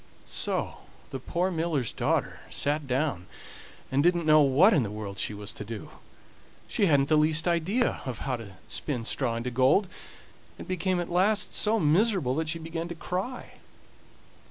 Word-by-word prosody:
So - - -1 0.3
the 135 - -4
poor 175 +8 -1
miller's 160 - -1
daughter - - -1
sat 145 0 -1
down, 130 - -1 0.6
and 135 +1 +3
didn't 175 +1 +2
know 155 0 +6
what 145 +10 +5
in 150 - +4
the 110 - -2
world 105 -2 -6
she - - -1
was 105 0 -5
to - - -7
do. 105 -1 -8 0.8
She 200 - +1
hadn't 140 -3 +3
the 155 - +3
least 155 +2 +2
idea 175 +8 +1
of 130 -3 -4
how 130 -2 -1
to 100 -5 -11
spin 125 -6 -3
straw 120 -1 -1
into 120 +2 -3
gold, 130 - +3 0.7
and - - -9
became 185 0 0
at 175 0 -4
last 200 +4 +2
so 220 +1 +2
miserable 175 - +2
that 160 -1 -1
she 165 - -1
began 165 +1 -5
to 170 - -6
cry. 185 +9 -5
155 Hz, 170 wpm, -28 LUFS, 130-175 Hz, 0.8 s, know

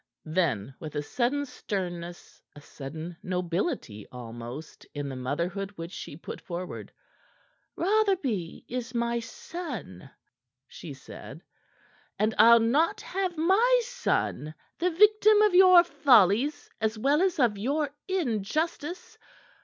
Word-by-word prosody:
Then 155 - 0
with 155 -1 -8
a 145 - -1
sudden 260 - -1
sternness, 175 -8 -6
a - - -10
sudden 155 +5 -8
nobility 180 - -3
almost 120 +4 -9
in 145 -1 -3
the 135 - -6
motherhood 170 +10 -3
which 165 0 -7
she 145 - -8
put - - -8
forward 175 0 -6 0.8
"Rotherby 355 - 0
is 245 -1 -5
my 235 0 0
son," 230 - -7 0.6
she 150 -5 -9
said, 135 - -11 0.7
"and 215 +2 +1
I'll 235 0 +8
not 270 +9 +2
have 370 -2 -3
my 430 +10 +4
son 450 - -2 0.2
the 360 - +2
victim 425 +4 +5
of 420 -3 +3
your 365 -1 +8
follies 260 - +3
as 220 0 0
well 280 +8 +2
as 375 -2 +1
of 235 -7 +2
your 285 +6 -1 0.2
injustice. 315 - -2
230 Hz, 120 wpm, -28 LUFS, -, 0.8 s, I'll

